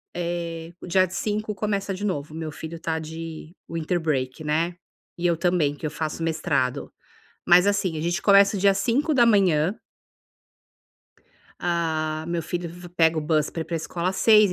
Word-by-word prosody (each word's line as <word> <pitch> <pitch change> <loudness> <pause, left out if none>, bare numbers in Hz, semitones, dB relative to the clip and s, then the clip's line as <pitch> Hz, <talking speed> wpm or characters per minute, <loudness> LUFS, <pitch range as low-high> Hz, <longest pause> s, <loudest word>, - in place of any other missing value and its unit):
eh, 170 -1 -4
o - - -8
dia 185 +1 +3
5 210 +3 -2
começa 200 -1 -2
de 195 +2 -6
novo, 155 -6 -2
o - - -7
meu 160 -1 -4
filho 160 +2 -7
tá 160 -1 -2
de 160 +1 -7 0.2
winter 165 +1 -1
break, 135 -2 -2
né, 165 +3 0 0.4
e 175 - +2
eu 170 -2 +1
também, 170 -5 +1
que 155 - -7
eu 150 - -2
faço 160 +1 -4
mestrado, 140 -5 -1 0.6
mas 180 +2 +7
assim, 200 -5 +1
a 155 - -3
gente 175 +4 0
começa 200 0 +6
o 190 - -2
dia 200 0 +5
às 195 - -2
5h 275 +9 +1
da 240 -2 +6
manhã 190 -4 +3 1.8
Ah, 160 -2 -1
meu 170 -1 -1
filho 175 +1 -4
v 175 +1 -10
pega 165 -2 +3
o - - +1
bus 155 -1 +1
pra 165 - -3
ir - - -10
para 170 - -3
escola 170 +3 -2
às 190 - -6
6h, 215 -4 +6
170 Hz, 190 wpm, -24 LUFS, 160-190 Hz, 1.8 s, mas